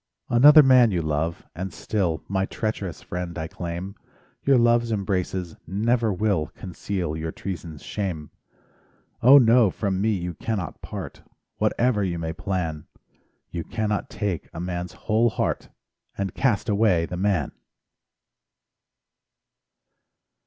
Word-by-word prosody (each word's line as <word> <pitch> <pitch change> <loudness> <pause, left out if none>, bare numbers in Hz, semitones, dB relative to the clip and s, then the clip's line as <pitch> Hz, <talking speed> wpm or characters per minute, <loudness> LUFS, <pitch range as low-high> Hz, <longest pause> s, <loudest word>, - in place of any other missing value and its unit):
Another 145 +6 +8
man 130 -3 +6
you 90 -5 -1
love, 80 +2 -2
and 95 +2 -5
still 90 -7 -2
My 95 0 0
treacherous 105 -5 -4
friend 90 -1 -5
I 80 -1 -3
claim; 85 +3 -5 0.5
Your 135 -2 +5
love's 120 -1 +3
embraces 95 -4 -2
never 115 +5 +1
will 95 -5 0
Conceal 90 -2 -4
your 80 0 -4
treason's 85 -6 -7
shame. 85 -8 -4 0.9
Oh 135 +4 +9
no! 120 -3 +6
from 95 0 -2
me 110 - +2
you 90 -3 -3
cannot 100 +1 -4
part, - - -7 0.4
Whatever 115 -4 +1
you 90 -3 -1
may 80 -1 -3
plan; 85 -4 -3 0.6
You 85 -1 -4
cannot 105 +1 -2
take 100 -6 -3
a - - -5
man's 90 0 -4
whole 115 +2 +3
heart - - -2 0.5
And 100 -1 -2
cast 120 -7 +1
away 100 -5 +3
the 90 - -6
man. 95 -6 0
95 Hz, 125 wpm, -24 LUFS, 85-110 Hz, 0.9 s, Oh